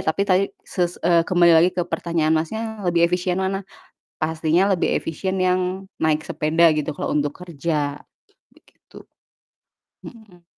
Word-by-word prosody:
tapi 160 Hz, +5 st, +1 dB
tadi 185 Hz, +1 st, +4 dB, 0.2 s
ses 175 Hz, -1 st, -2 dB
eee, 170 Hz, -1 st, +4 dB
kembali 175 Hz, -1 st, +5 dB
lagi 175 Hz, +3 st, +5 dB
ke 175 Hz, -, +1 dB
pertanyaan 165 Hz, -2 st, -1 dB
Masnya, 165 Hz, +8 st, -2 dB, 0.3 s
lebih 170 Hz, -1 st, +3 dB
efisien 180 Hz, 0 st, -1 dB
mana? 195 Hz, +1 st, -1 dB, 0.6 s
Pastinya 160 Hz, +3 st, +1 dB
lebih 180 Hz, -, 0 dB
efisien 190 Hz, +4 st, -4 dB
yang 185 Hz, +1 st, 0 dB, 0.2 s
naik 155 Hz, -1 st, +2 dB
sepeda 160 Hz, +2 st, +3 dB
gitu, 150 Hz, -1 st, -2 dB
kalo -, -, -2 dB
untuk 145 Hz, -1 st, 0 dB
kerja, 150 Hz, -4 st, -3 dB, 0.5 s
begitu. -, -, -21 dB, 1.1 s
Mhm. 205 Hz, -7 st, -14 dB
170 Hz, 135 wpm, -22 LUFS, 160-185 Hz, 1.1 s, kembali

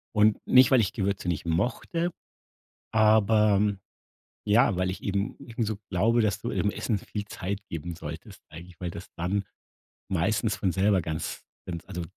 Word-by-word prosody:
und 105 Hz, 0 st, +4 dB
nicht, 130 Hz, -1 st, +7 dB
weil 130 Hz, -, +6 dB
ich 100 Hz, -1 st, 0 dB
Gewürze 100 Hz, -2 st, -2 dB
nicht 85 Hz, -1 st, -2 dB
mochte, 125 Hz, -, -1 dB, 0.8 s
aber, 105 Hz, -2 st, +4 dB, 0.7 s
ja, 110 Hz, 0 st, +4 dB
weil 90 Hz, +1 st, 0 dB
ich 95 Hz, -, -7 dB
eben 100 Hz, 0 st, -1 dB
eben 115 Hz, 0 st, -4 dB
so 110 Hz, -1 st, -2 dB
glaube, 115 Hz, +6 st, +3 dB
dass 105 Hz, -4 st, +1 dB
du -, -, -3 dB
im 105 Hz, -, +1 dB
Essen 110 Hz, -4 st, -1 dB
viel 105 Hz, -1 st, -6 dB
Zeit 100 Hz, 0 st, -5 dB
geben 85 Hz, +1 st, -5 dB
solltest, 80 Hz, -1 st, -9 dB
eigentlich, 85 Hz, +2 st, -12 dB
weil 90 Hz, -2 st, -3 dB
das 85 Hz, -, -8 dB
dann 95 Hz, +4 st, 0 dB, 0.7 s
meistens 100 Hz, +5 st, +1 dB
von 95 Hz, -, 0 dB
selber 95 Hz, 0 st, +3 dB
ganz 80 Hz, -1 st, -4 dB, 0.2 s
ganz 85 Hz, -2 st, -5 dB
also 90 Hz, -1 st, -4 dB
100 Hz, 165 wpm, -27 LUFS, 90-110 Hz, 0.8 s, nicht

